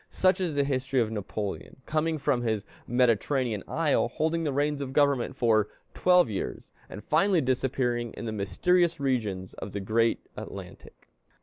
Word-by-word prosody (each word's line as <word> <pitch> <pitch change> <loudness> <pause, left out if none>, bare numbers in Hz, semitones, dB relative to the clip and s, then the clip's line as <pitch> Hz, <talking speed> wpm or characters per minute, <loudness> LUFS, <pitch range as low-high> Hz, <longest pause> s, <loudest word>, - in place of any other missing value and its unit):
Such 190 0 +2
is 170 -5 -1
the 140 - +3
history 130 -1 0
of 110 -2 +1
Napoleon, 105 +4 -5
coming 155 +1 0
from 140 -4 +1
his 110 -4 -1 0.2
Mediterranean 120 -1 +1
isle, 155 -6 +1
holding 160 +6 -1
the 150 - 0
reins 145 +1 0
of 135 -1 -4
government 140 -3 +2
for 110 -5 +3 0.3
twelve 180 -3 +4
years, 105 -4 -5 0.2
and 105 - -8
finally 185 +4 +3
disappearing 125 -3 0
in - - -6
the 110 - -2
mysterious 170 - +1
regions 110 -9 -1
of 95 - -8
the 100 - -2
great 115 +4 +1 0.2
Atlantic. - - -10
130 Hz, 160 wpm, -28 LUFS, 110-150 Hz, 0.3 s, twelve